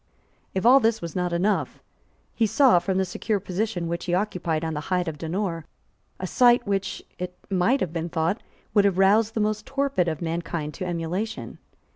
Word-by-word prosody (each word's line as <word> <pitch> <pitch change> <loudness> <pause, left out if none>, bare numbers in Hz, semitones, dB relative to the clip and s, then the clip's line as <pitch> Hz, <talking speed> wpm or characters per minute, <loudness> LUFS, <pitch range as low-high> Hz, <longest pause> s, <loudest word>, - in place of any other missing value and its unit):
If 190 - -1
all 260 +3 +8
this 225 -2 +2
was 170 -2 -7
not 180 -1 0
enough, 190 +5 0 0.5
he 225 - +2
saw, 225 -3 +5
from 190 +1 -1
the 190 - +2
secure 200 +3 -2
position 185 -2 -2
which 170 +1 -3
he 175 -1 +1
occupied 175 -5 -1
on 160 - -2
the 150 - -2
height 180 -1 +1
of 155 -2 -4
Donore, 165 0 -3 0.5
a 185 - -3
sight 240 +4 +4
which, 195 -2 -2 0.2
it 180 0 -5
might 195 +9 +2
have 170 -3 -2
been 170 0 -3
thought, 165 +6 0 0.3
would 205 -2 +5
have 195 -3 +2
roused 210 +3 +4
the - - 0
most 215 0 -1
torpid 275 -10 0
of 160 -2 -2
mankind 165 -2 -3
to 185 - -5
emulation. 180 +6 -3
185 Hz, 190 wpm, -25 LUFS, 170-215 Hz, 0.5 s, all